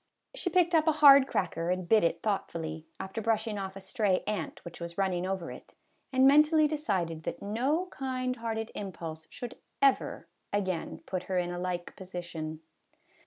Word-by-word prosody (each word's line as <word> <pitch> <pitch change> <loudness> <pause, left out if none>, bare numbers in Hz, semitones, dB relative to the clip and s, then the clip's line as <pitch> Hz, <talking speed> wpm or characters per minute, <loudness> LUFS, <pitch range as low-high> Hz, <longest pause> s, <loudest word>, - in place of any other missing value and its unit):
She - - -2
picked 350 0 +3
up 320 -1 +4
a 315 - +5
hard 280 -3 +8
cracker. 170 -5 -1
and 180 -1 -1
bit 220 0 +5
it 170 0 0
thoughtfully, 160 -6 -3
after 190 +4 -4
brushing 220 -1 0
off 190 0 -5
a - - -6
stray 195 -1 0
ant 205 -6 -4
which 170 - -9
was 170 0 -6
running 185 -2 0
over 190 -3 -3
it, - - -12 0.4
and 260 0 +4
mentally 300 +2 +6
decided 190 - -1
that - - -5
no 260 - 0
kind 255 -1 -2
hearted 225 -1 -3
impulse 165 -5 -6
should 245 0 -8 0.2
ever 275 -1 +2 0.2
again 190 -5 -2
put 185 -1 -3
her 185 - -1
in 175 0 0
a 175 - -4
like 180 -1 -3
position. 175 -4 -6
195 Hz, 170 wpm, -30 LUFS, 175-255 Hz, 0.4 s, hard